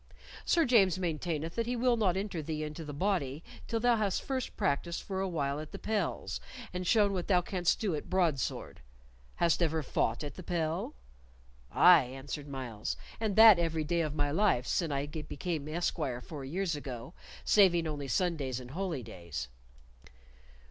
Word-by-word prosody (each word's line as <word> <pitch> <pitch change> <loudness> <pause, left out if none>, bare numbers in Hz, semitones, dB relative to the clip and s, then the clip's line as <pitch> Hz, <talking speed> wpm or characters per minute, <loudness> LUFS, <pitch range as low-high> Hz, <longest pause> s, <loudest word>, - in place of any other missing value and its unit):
"Sir 335 -2 +3
James 195 -8 +4
maintaineth 165 -2 -2
that 230 0 -2
he 245 - -1
will 245 0 +3
not 195 -5 +1
enter 195 -4 -3
thee 155 0 -3
into 150 +2 -6
the 150 - -6
body 150 -3 -1 0.2
till 230 - -1
thou 240 0 +3
hast 205 -3 0
first 260 -2 -3
practised 170 +5 -1
for 190 -1 -4
a 195 - 0
while 145 -5 -1
at 155 0 -8
the - - -6
pels, 215 -1 -2 0.3
and 180 0 -3
shown 205 -2 +4
what 180 -2 -3
thou 185 -3 +4
canst 180 -1 0
do 205 -6 0
at 150 - -5
broadsword. 170 -8 -1 0.5
Hast 170 0 +2
ever 160 -2 +1
fought 120 0 0
at 145 -2 -5
the - - -9
pel?" 165 - -2 0.8
"Aye," 170 -7 +7
answered 135 +3 -7
Myles, 125 -6 -4 0.2
"and 215 -3 -1
that 220 -4 +9
every 165 -2 0
day 170 +2 0
of 155 -2 -2
my 145 -1 0
life 165 -8 +2
sin 165 +2 0
I 140 0 -1
became 150 0 -4
esquire 155 -6 -1
four 140 +2 -8
years 170 +4 -2
ago, 135 +1 -7 0.3
saving 180 -5 +5
only 145 -3 -4
Sundays 140 -6 -1
and 125 0 -10
holy 170 -5 -3
days." 85 - -7
165 Hz, 175 wpm, -31 LUFS, 145-190 Hz, 0.8 s, that